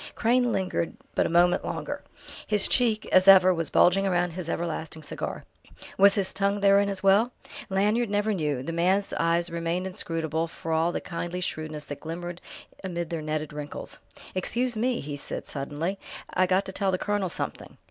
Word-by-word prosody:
Crane 245 +1 +2
lingered 185 -4 -1 0.2
but - - +2
a - - -5
moment 175 +1 +4
longer. - - -4 0.5
His 210 -1 +3
cheek, 225 -3 +2
as 185 +1 +5
ever, 185 -1 +8
was 165 -2 -2
bulging 195 +2 +4
round 175 -1 +1
his 175 -1 -5
everlasting 160 -2 -3
cigar. - - -5 0.5
Was 200 +1 +6
his 195 -3 +1
tongue 200 0 0
therein 200 0 +5
as 195 -1 -4
well? 200 +5 +4 0.4
Lanyard 210 +4 +1
never 205 +1 +1
knew; 150 -8 -1
the 165 - -4
man's 185 +4 +1
eyes 170 +1 +1
remained 170 +2 -2
inscrutable 165 -3 -2
for 165 0 -7
all 165 +2 +2
the - - -3
kindly 175 +1 -4
shrewdness 155 -4 -4
that 145 - -7
glimmered 175 +2 -6 0.4
amid 175 -3 -4
their 165 -2 -2
netted 155 0 -3
wrinkles. 150 0 -5 0.3
"Excuse 240 +6 -1
me!" 240 +3 0
he 145 0 -5
said 140 - -5
suddenly. 150 +7 -4 0.3
"I 185 - +3
got 185 +2 +2
to - - -5
tell 195 0 0
the 185 - +1
colonel 205 -1 -1
something." - - -5
180 Hz, 180 wpm, -27 LUFS, 165-200 Hz, 0.5 s, ever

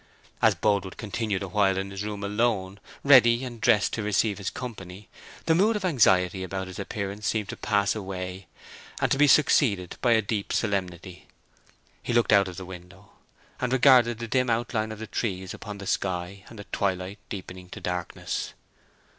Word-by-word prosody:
As - - +4
Boldwood 100 -3 0
continued 105 -2 -3
awhile 95 0 +1
in 95 +1 -3
his 100 +1 -5
room 105 -1 -5
alone—ready 115 +4 +2
and 120 -3 -8
dressed 105 -2 +3
to 110 - -2
receive 105 0 0
his 100 - -2
company—the 105 - -6
mood 205 +7 +3
of 205 -2 -2
anxiety 95 - +3
about 95 +1 -4
his 95 +1 -9
appearance 100 0 -4
seemed 105 +1 -1
to - - -4
pass 100 -1 +1
away, 95 -2 -6 0.5
and - - 0
to - - +3
be 150 - +6
succeeded 120 - +3
by 120 -2 +4
a 110 - +4
deep 100 0 -3
solemnity. 90 -3 -3 0.7
He - - -3
looked 120 -1 +3
out 100 -1 +5
of 90 -2 -8
the 95 - -6
window, 95 +2 -12 0.5
and 125 -1 -1
regarded 125 -3 +5
the 115 0 -5
dim 125 +2 +1
outline 115 -1 -1
of 110 - -7
the 110 - -6
trees 95 -5 -3
upon 105 -2 -8
the 100 - -8
sky, 95 0 -3
and 115 - -12
the 100 - -8
twilight 95 0 -2
deepening 90 -2 -8
to - - -8
darkness. 90 -1 -4
100 Hz, 170 wpm, -26 LUFS, 95-115 Hz, 0.7 s, be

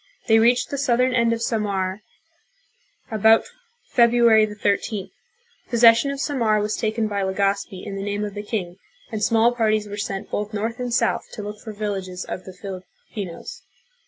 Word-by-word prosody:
They 225 -1 +5
reached 240 +2 +3
the 280 - -2
southern 255 -1 +2
end 235 -2 +3
of 230 0 -1
Samar 200 -4 -1 1.1
about 220 +1 +5 0.4
February 235 -2 +5
the 210 - -8
13th. 205 0 -1 0.6
Possession 235 +2 +5
of 280 0 -4
Samar 230 -7 +1
was 210 +1 -1
taken 220 0 -1
by 200 -1 -2
Legazpi 195 0 -1
in 195 - -5
the - - -4
name 205 +1 -2
of 205 - -6
the 205 - -5
king, 190 -4 -4 0.3
and 215 -2 -3
small 230 +3 +4
parties 215 -3 +1
were 205 0 -7
sent 195 -1 -4
both 210 +1 -3
north 225 +4 -3
and 250 -1 -3
south 240 - +1
to 210 - -6
look 210 0 -7
for 220 - -8
villages 195 -3 -4
of 185 - -6
the 190 - -9
Fil 190 -2 -6 0.3
ipinos. 190 -6 -7
215 Hz, 175 wpm, -23 LUFS, 200-230 Hz, 1.1 s, They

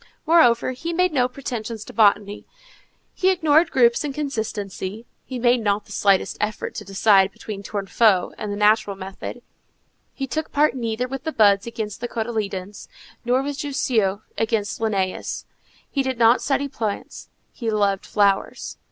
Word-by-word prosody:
Moreover, 280 -8 +4
he 330 +7 -5
made 365 +1 +2
no 250 -3 +3
pretensions 235 -4 -5
to - - -11
botany; 205 -1 +2 0.7
he 375 - +2
ignored 325 -2 +3
groups 240 -3 +3
and 285 -2 -4
consistency; 220 -6 -4 0.2
he 260 - -5
made 245 0 +3
not 205 -1 0
the - - -15
slightest 200 -2 +2
effort 210 0 -2
to - - -6
decide 195 0 +3
between 200 0 -7
Tournefort 200 -1 +1
and 210 - -4
the 205 - -3
natural 210 -1 +3
method; 195 +5 -8 0.7
he 270 - -4
took 300 +5 -4
part 295 -2 +3
neither 235 0 -2
with 270 +1 -6
the 315 - -2
buds 205 -4 +4
against 220 -2 -5
the 240 - -2
cotyledons, 210 -4 -4 0.4
nor 250 +2 +1
with 285 0 -4
Jussieu 220 -8 0 0.2
against 220 -2 -1
Linnæus. 195 -4 -2 0.4
He 275 - -1
did 260 -2 -2
not 230 +1 +5
study 280 0 0
plants; 220 -7 -5 0.2
he 230 -3 -3
loved 200 -2 0
flowers. 200 -2 0
225 Hz, 155 wpm, -22 LUFS, 205-260 Hz, 0.7 s, not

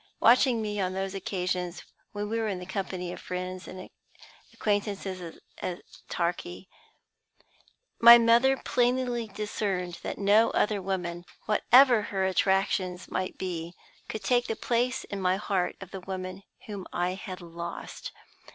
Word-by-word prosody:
Watching 240 -1 +5
me 210 -1 -3
on 185 0 -1
those 190 0 -3
occasions 180 -2 -3 0.3
when 205 0 -4
we 225 +2 -1
were 225 - 0
in 195 -3 -2
the 180 - -7
company 185 -1 -4
of - - -8
friends 185 0 -5
and 185 0 -8 0.6
acquaintances 200 -4 -2 0.2
at 180 -1 -4 0.3
Torquay, 175 +1 -3 1.3
my 235 0 +11
mother 235 +3 +4
plainly 245 -2 0
discerned 195 -4 -3
that - - -4
no 205 +3 +4
other 210 -2 +1
woman, 180 -2 -3 0.2
whatever 240 +2 +6
her 195 -2 -1
attractions 190 -1 +1
might 185 0 -2
be, 175 -2 -4 0.3
could 215 - -5
take 245 +4 +2
the 225 - -1
place 250 +3 0
in 200 -1 -6
my 185 0 +2
heart 195 -3 -1
of 195 -2 -10
the 190 - -6
woman 185 0 -5 0.2
whom 200 -3 -7
I 175 +1 0
had 185 -1 -7
lost. 170 0 -7
195 Hz, 140 wpm, -28 LUFS, 180-215 Hz, 1.3 s, my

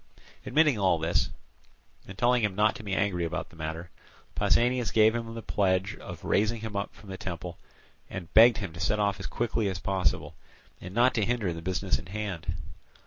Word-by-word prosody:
Admitting 150 -7 +3
all 95 -3 +3
this, 80 -1 +1 0.8
and 100 - -10
telling 120 0 +3
him 105 -3 0
not 105 +1 +3
to - - -9
be 100 -3 -3
angry 95 -3 0
about 85 - -3
the - - -16
matter, 80 +2 -5 0.4
Pausanias 120 -2 +2
gave 110 +1 +5
him 115 -1 -4
the 115 - -6
pledge 95 +1 +1
of - - -9
raising 110 +2 +1
him 110 -2 -6
up 100 0 -3
from 100 - -12
the 95 - -5
temple, 90 -1 -6 0.5
and 90 -2 -7
begged 115 +1 +8
him 95 -6 -5
to 85 - -9
set 105 +3 +1
off 100 -1 0
as - - -5
quickly 115 -3 -1
as 95 - -3
possible, 95 +2 -1 0.5
and 90 +2 -8
not 120 +2 +4
to 110 - +1
hinder 110 -6 0
the 80 - -7
business 95 +2 -1
in - - -11
hand. 95 -4 -4
100 Hz, 195 wpm, -28 LUFS, 90-110 Hz, 0.8 s, begged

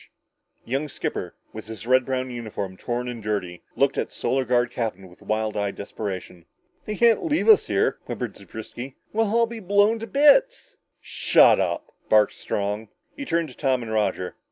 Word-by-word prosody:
The - - -14
young 140 +3 -1
skipper, - - -4 0.2
his 110 0 -8
red 130 +1 +4
brown 130 -1 -2
uniform 110 -5 -5
torn 120 +5 -3
and 120 -2 -5
dirty, 100 -5 -3
looked - - +2
at - - -2
the - - -16
Solar 130 0 0
Guard 120 -1 +2
captain 100 -5 -4
with 90 - -19
wild 110 0 -1
eyed 100 -1 -1
desperation. 95 -4 -6 0.4
"They 215 - -3
can't 235 - +4
leave 320 +3 0
us 435 -2 +6
here," - - +1
whimpered - - -5
Zewbriski. 120 +4 -9 0.2
"We'll 225 +1 +2
all 230 +2 +3
be 230 0 -7
blown 205 +3 +3
to 225 - -6
bits!" - - +4 0.3
"Shut - - +4
up!" - - -2 0.2
barked 105 -1 +5
Strong. 105 +2 -3 0.3
He 285 - -6
turned 170 - 0
to 125 - -13
Tom 130 -4 0
and 110 - -6
Roger. 105 -4 -1
125 Hz, 180 wpm, -24 LUFS, -, 0.4 s, us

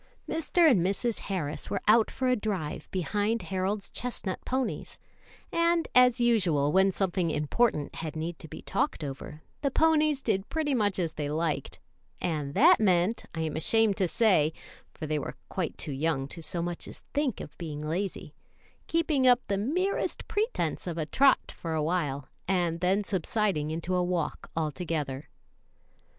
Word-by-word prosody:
Mr. 325 +1 +3
and 205 - +5
Mrs. 200 +5 0
Harris 160 -7 -3
were - - -1
out 220 +1 +6
for 260 - -2
a 255 - +4
drive 190 -9 -3
behind 205 +5 -1
Harold's 195 +2 -2
chestnut 235 -6 -4
ponies, 260 0 -2 0.5
and, 335 0 +2
as 250 -1 +6
usual, 180 -12 +3
when 190 +3 +4
something 185 -2 0
important 150 +2 +1
had 160 -2 -5
need 160 +2 -4
to - - -9
be - - -9
talked - - -1
over, 145 +2 -7 0.2
the 280 - +1
ponies 305 -1 +3
did 200 -3 0
pretty 310 -3 0
much 205 -6 +1
as 170 -4 0
they 150 -2 -4
liked, 155 0 -2 0.4
and 150 -4 -2
that 345 +5 +7
meant, 185 +1 +2
I 160 - -2
am 160 -2 -2
ashamed 220 +6 +3
to 190 - +2
say 170 -7 +3 0.4
(for 155 - -7
they 155 0 0
were - - -5
quite 180 -4 -3
too 150 - -5
young 135 -1 0
to 170 - -8
so 170 +1 -3
much 175 0 -4
as - - -10
think 290 -3 0
of 145 - -8
being 150 -3 -5
lazy), 185 +5 -3 0.5
keeping 310 -5 +2
up 245 0 +6
the 200 - +1
merest 360 - -1
pretence 435 - -1
of 170 -1 -3
a 160 - -1
trot 270 - +3
for 165 -1 -4
a 155 - 0
while, 150 -5 -1 0.2
and 175 -3 +1
then 190 +4 +2
subsiding 190 -4 0
into 165 +3 -3
a 180 0 +2
walk 175 -4 -2
altogether. 155 -3 -3
185 Hz, 165 wpm, -29 LUFS, 160-235 Hz, 0.5 s, that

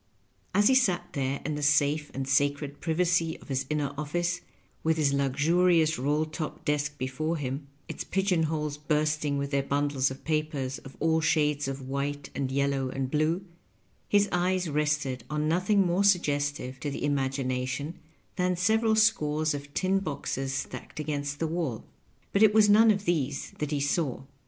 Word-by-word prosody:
As 205 +1 +5
he 265 - +5
sat 240 -9 +2
therein 140 +1 -2
the 150 - -4
safe 145 +1 +2
and 135 0 -3
sacred 145 +1 +1
privacy 165 0 +1
of - - -17
his 135 -1 -1
inner 145 -2 -1
office, 175 +4 -1 0.4
with 160 0 +2
his 145 -3 +2
luxurious 155 +4 +2
roU 145 +4 +1
top 155 0 -6
desk 145 0 -1
before 150 +6 -2
him, 140 0 -4 0.2
its - - -5
pigeon 190 -3 +1
holes 150 -2 -2
bursting 150 -1 0
with 140 0 -3
their 140 -1 +2
bundles 140 -1 0
of 130 - -9
papers 150 -4 -2
of 135 - -13
all 160 0 +2
shades 150 -3 +1
of 135 -1 -5
white, 140 +1 -3
and 135 -1 -2
yellow, 140 -1 0
and 130 0 -3
blue, 160 +5 +1 0.6
his 205 0 +4
eyes 180 0 +1
rested 150 -4 -1
on 150 0 -1
nothing 185 +4 +2
more 180 +3 +2
suggestive 145 -8 +1
to 145 - -3
the 140 - -5
imagination 135 +1 -2 0.4
than 180 -1 +1
several 220 +5 +2
scores 155 -8 +2
of 145 0 -7
tin 190 +1 +2
boxes 140 -6 -3
stacked 135 +3 -5
against 145 -1 -3
the 165 - -1
waU; 160 -8 -2 0.5
but 200 - +2
it 215 -1 +6
was 215 -1 +6
none 220 +2 +6
of 205 -1 +2
these 145 -5 -1
that 150 - -2
he 145 -1 -1
saw. 140 -1 -1
150 Hz, 165 wpm, -28 LUFS, 140-170 Hz, 0.6 s, it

